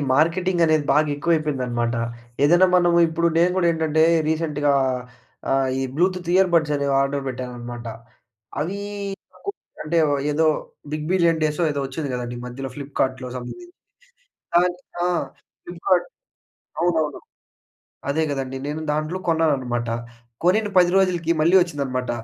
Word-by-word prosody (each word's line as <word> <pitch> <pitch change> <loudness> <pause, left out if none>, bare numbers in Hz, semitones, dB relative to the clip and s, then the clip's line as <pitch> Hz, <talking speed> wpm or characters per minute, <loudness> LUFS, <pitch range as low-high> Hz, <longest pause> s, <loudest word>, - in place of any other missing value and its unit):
Marketing 170 +4 +2
అనేది 155 -2 +2
బాగా 150 +1 +3
ఎక్కువైపోయిందన్నమాట. 130 -7 0 0.5
ఏదైనా 175 +5 +6
మనము 175 -1 +4
ఇప్పుడు 170 +1 +1
నేను 175 +2 +4
కూడా 175 -2 +2
ఏంటంటే 160 -1 +1 0.3
రీసెంట్‌గా 150 -3 +1 0.8
ఆహ్, 135 -1 +2
ఈ - - 0
బ్లూటూత్ 180 +1 0
ఇయర్ 190 -1 +5
బడ్స్ 155 -3 +3
అనేవి 140 -1 0
ఆర్డర్ 140 0 -1
పెట్టానన్నమాట. 120 -1 -6 0.7
అవి 185 +6 -2 0.7
కో 400 - -1 0.3
అంటే, 165 +2 +1
ఓ - - +2 0.2
ఏదో 160 +2 +2 0.5
బిగ్ 155 0 -3
బిలియన్ 170 -3 +3
డేసో 150 +3 0
ఏదో 140 - -2
వచ్చింది 145 +1 -4
గదండీ! 120 -1 -4
మధ్యలో 135 +2 -6
ఫ్లిప్‌కార్ట్‌లో 135 -2 -2
సంబధించింది. 350 - -9 0.9
అన్ 180 0 +1 0.3
ఆ! - - +2 0.6
ఫ్లిప్‌కార్ట్ 175 +1 0 0.7
అవునవును. 160 -4 0 0.9
అదే 160 +3 +1
గదండీ! 135 -1 -4
నేను 155 +2 -4
దాంట్లో 155 +5 -2
కొన్నానన్నమాట. 130 -8 +1 0.6
కొనిన 210 +4 +3
10 175 -1 +5
రోజులకి 175 -4 +2
మళ్ళీ 170 +4 +4
వచ్చిందన్నమాట. 135 -7 -2
155 Hz, 125 wpm, -22 LUFS, 135-175 Hz, 0.9 s, ఏదైనా